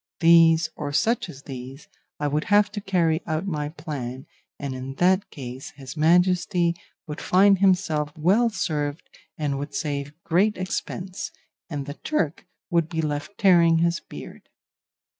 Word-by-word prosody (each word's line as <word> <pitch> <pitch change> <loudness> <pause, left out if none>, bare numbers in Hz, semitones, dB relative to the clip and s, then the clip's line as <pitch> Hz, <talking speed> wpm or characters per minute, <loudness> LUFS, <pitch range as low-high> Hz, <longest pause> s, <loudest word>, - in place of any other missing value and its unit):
These, 165 -1 +6
or 145 -2 -4
such 230 +10 +1
as 140 +1 -11
these, 135 +1 -9 0.3
I 145 - 0
would 150 +1 -1
have 205 0 +4
to 205 -1 -5
carry 175 -4 +1
out 155 +2 -1
my 150 -6 -2
plan, 140 -5 -6 0.3
and 140 -2 -4
in 130 +1 -6
that 185 +5 +2
case 130 -2 -8
his 135 0 -9
Majesty 175 +2 +3 0.3
would 150 -1 -6
find 195 +1 +4
himself 160 -6 +2
well 200 +10 +3
served 150 -8 -3 0.3
and 145 -3 -1
would 145 +1 -6
save 145 -2 -3
great 195 +6 +2
expense, 185 0 -4 0.4
and 145 -4 -4
the 145 - -6
Turk 175 - -1 0.2
would 170 -2 +2
be 160 -2 -2
left 150 +5 -4
tearing 170 -4 +5
his 170 +1 +1
beard. - - -11
160 Hz, 150 wpm, -24 LUFS, 145-180 Hz, 0.4 s, These